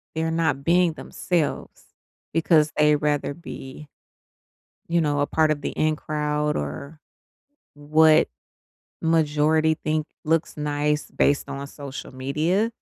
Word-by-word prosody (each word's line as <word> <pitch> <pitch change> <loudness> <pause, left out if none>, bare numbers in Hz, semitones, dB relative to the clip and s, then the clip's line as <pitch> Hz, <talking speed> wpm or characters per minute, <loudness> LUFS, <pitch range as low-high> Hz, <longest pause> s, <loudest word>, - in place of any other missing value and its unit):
they're 160 0 -1
not 160 -4 0
being 170 0 +3
themselves, 165 -1 -3 0.5
because 160 -2 +3
they 150 0 +5
rather 145 -1 -1
be, 150 -3 -10 1.0
you 170 0 +2
know, 145 -1 0
a 145 - +2
part 155 -1 +2
of 145 -1 0
the - - -3
in 155 0 0
crowd, 150 0 -1
or 75 - -5 0.8
what 155 +2 +4 0.7
majority 160 0 +2
think 155 0 -2 0.2
looks 160 +1 0
nice 150 0 -1
based 140 0 +1
on 140 0 -5
social 140 -2 -9
media 160 - 0
150 Hz, 120 wpm, -24 LUFS, 145-160 Hz, 1.0 s, they